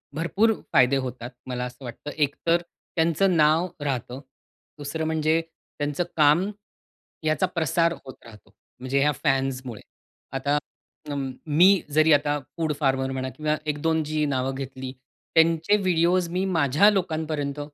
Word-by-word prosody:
भरपूर 200 +7 +2 0.2
फायदे 130 +1 +5
होतात 125 -2 -5 0.2
मला 125 -1 -3
असं 125 +2 -10
वाटतं. 125 +4 -7
एकतर 165 +3 +1 0.3
त्यांचं 170 +3 +2
नाव 155 +3 +4 0.2
राहतं, 130 -2 -3 0.6
दुसरं 150 +2 -4
म्हणजे 160 +1 +1 0.4
त्यांचं 145 +4 -1
काम 155 +6 +4 0.7
ह्याचा 155 +4 +2
प्रसार 165 +1 +2
होत 130 - -8
राहतो, 110 -3 -15 0.3
म्हणजे 130 +2 0
ह्या 150 +2 +3
फॅन्समुळे. 135 -4 -1 0.5
आता 140 +2 0 0.5
अं, 135 -2 -3 0.2
मी 180 +5 +5
जरी 155 +2 +4
आता 145 0 +2 0.2
फूड 160 -2 0
फार्मर 135 -2 +1
म्हणा 130 0 -3
किंवा 155 0 0
1-2 160 +2 0
जी 155 0 0
नावं 130 -1 -1
घेतली 130 -1 -6 0.4
त्यांचे 165 +5 +4
व्हिडिओ 180 -2 +2
मी 180 +2 -1
माझ्या 165 +1 +4
लोकांपर्यंत 155 -7 -2
150 Hz, 130 wpm, -25 LUFS, 135-165 Hz, 0.7 s, फायदे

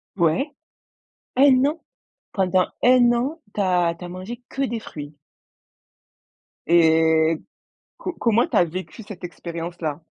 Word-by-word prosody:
Ouais. 175 - +1 0.8
1 265 -1 +6
an? 315 +3 -1 0.5
Pendant 185 -2 +2 0.2
1 245 -1 +6
an, 275 +7 -2
tu 210 - -2
as 180 -3 +2
tu 180 - -9
as - - -6
mangé 190 +7 -8
que 275 - -3
des 235 -4 -1
fruits? 150 -7 -9 1.5
Et 160 -1 +4 0.6
co 365 - -4
comment 230 +1 +2
tu - - -3
as 175 - +6
vécu 185 +7 -7
cette 195 -3 -10
expérience-là? 170 -2 -5
185 Hz, 130 wpm, -23 LUFS, 170-240 Hz, 1.5 s, 1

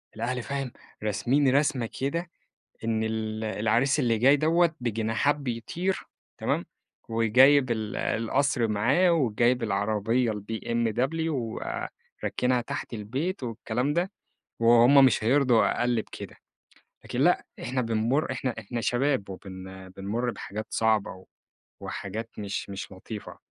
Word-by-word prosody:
الأهل 120 +3 -2
فاهم، 135 -3 -3 0.3
راسمين 125 +7 +2
رسمة 140 -6 +1
كده، 170 +6 -2 0.6
إن 110 -1 0
ال 110 0 -3
العريس 115 +7 +1
اللي 115 -4 +2
جاي 135 +5 +6
دوَّة 165 +2 +3
بجناحات 115 +4 +1
بيطير، 145 +8 -3 0.3
تمام، - - 0 0.4
وجايب 125 +4 +5
ال 110 -2 -2
القصر 120 +1 +1
معاه 135 - +3
وجايب 125 -4 +2
العربية 110 +3 +1
BMW 115 +8 -1
وراكنها 125 -1 -2
تحت - - -5
البيت 130 - -3
والكلام 120 +3 -2
ده، 175 +4 0 0.5
وهم 120 +4 +7
مش 115 -3 +2
هيرضوا 125 -1 +3
أقل 120 -2 +2
بكده. - - -10 0.7
لكن - - -3
لأ - - +3 0.2
إحنا 130 +1 -1
بنمر 115 +5 0
إحنا 125 -1 -2
إحنا 115 +2 -4
شباب 125 -1 0
وبن 95 0 -9
بنمر 115 +6 -2
بحاجات 105 0 -6
صعبة 105 -4 0 0.6
وحاجات 110 +4 -5
مش 100 -1 -4
مش 100 0 -6
لطيفة. 100 +3 -8
120 Hz, 115 wpm, -27 LUFS, 110-135 Hz, 0.7 s, وهم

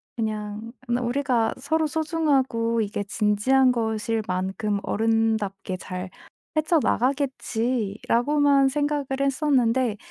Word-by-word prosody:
'그냥 215 0 -4
그냥 240 0 -1
우리가 245 -4 +1
서로 310 +4 0
소중하고 275 -8 0
이게 205 -1 -2
진지한 215 +6 +2
것일 225 -1 -1
만큼 190 +3 -1
어른답게 220 -4 0
잘 185 0 -6 0.4
헤쳐 310 +1 +3
나가겠지.'라고만 260 +1 +1
생각을 290 0 -1
했었는데 260 -5 +1
235 Hz, 255 characters per minute, -24 LUFS, 215-275 Hz, 0.4 s, 헤쳐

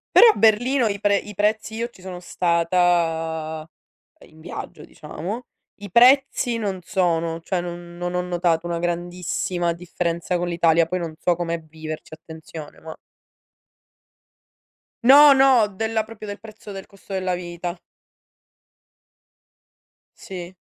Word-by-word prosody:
Però 475 - +10
a - - -10
Berlino 235 +3 +3
i 200 -1 -2
pre 205 -1 +3
i 210 +1 -6
prezzi 215 +2 0
io 235 +1 -3
ci 215 - -19
sono 180 -1 -7
stata 165 -3 0 0.6
in 155 - -19
viaggio 160 - -8
diciamo, 190 +10 -7 0.3
i 205 - -8
prezzi 245 +1 +4
non 195 -4 -3
sono, 165 -2 0
cioè 180 +2 -2
non 175 0 -8
non 175 0 -4
ho 180 - +1
notato 175 -2 0
una 170 -1 -2
grandissima 175 0 -2
differenza 170 0 -3
con 175 0 -2
l'Italia, 170 -1 +3
poi 180 +2 -2
non 165 -2 -5
so 175 -2 +2
com'è 170 -1 -3
viverci, 155 0 -9
attenzione, 160 -1 -11
ma 160 0 -9 2.1
No, 285 +4 +9
no, 265 -5 +5
della 220 +2 -2
proprio 215 -1 -11
del 205 0 -6
prezzo 215 0 -12
del 195 -1 -8
costo 195 0 -12
della 185 -1 -1
vita. 175 0 -6 2.4
Sì. 180 -1 -8
180 Hz, 135 wpm, -22 LUFS, 170-205 Hz, 2.4 s, Però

